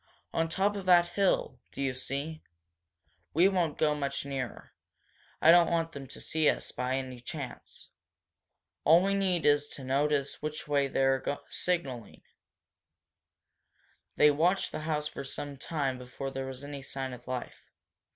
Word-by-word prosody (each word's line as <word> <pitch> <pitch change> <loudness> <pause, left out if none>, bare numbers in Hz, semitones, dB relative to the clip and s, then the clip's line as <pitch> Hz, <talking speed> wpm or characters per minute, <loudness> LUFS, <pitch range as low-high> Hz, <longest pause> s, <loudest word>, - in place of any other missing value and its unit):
On 165 0 +1
top 195 +5 +1
of 195 -2 -6
that 175 -1 +6
hill, 195 +1 +1
do - - -11
you 135 -2 0
see? 140 +5 -4 0.9
We 175 +4 +6
won't 175 -6 +1
go 150 -1 +3
much 140 -1 -3
nearer. 135 -3 -5 0.7
I 160 - +7
don't 175 0 +6
want 165 -1 0
them 140 -3 -8
to - - -9
see 160 -1 +2
us, - - -1
by 125 +1 -1
any 130 -2 -5
chance. 135 0 -8 0.9
All 165 +4 +6
we 195 +1 +2
need 190 -4 +1
is 145 0 +4
to 140 - -9
notice 140 +1 0
which 155 0 -4
way 140 -1 +2
they're 135 -1 +2 0.3
signalling." 135 - -3 1.9
They 150 - +6
watched 175 +6 +2
the - - -4
house 150 -1 0
for - - -6
some 140 +1 -5
time 135 -2 -2
before 130 +2 -6
there 135 0 -4
was 130 +1 -7
any 145 -1 -6
sign 135 -1 -4
of 125 0 -11
life. 125 -1 -5
145 Hz, 155 wpm, -30 LUFS, 135-165 Hz, 1.9 s, I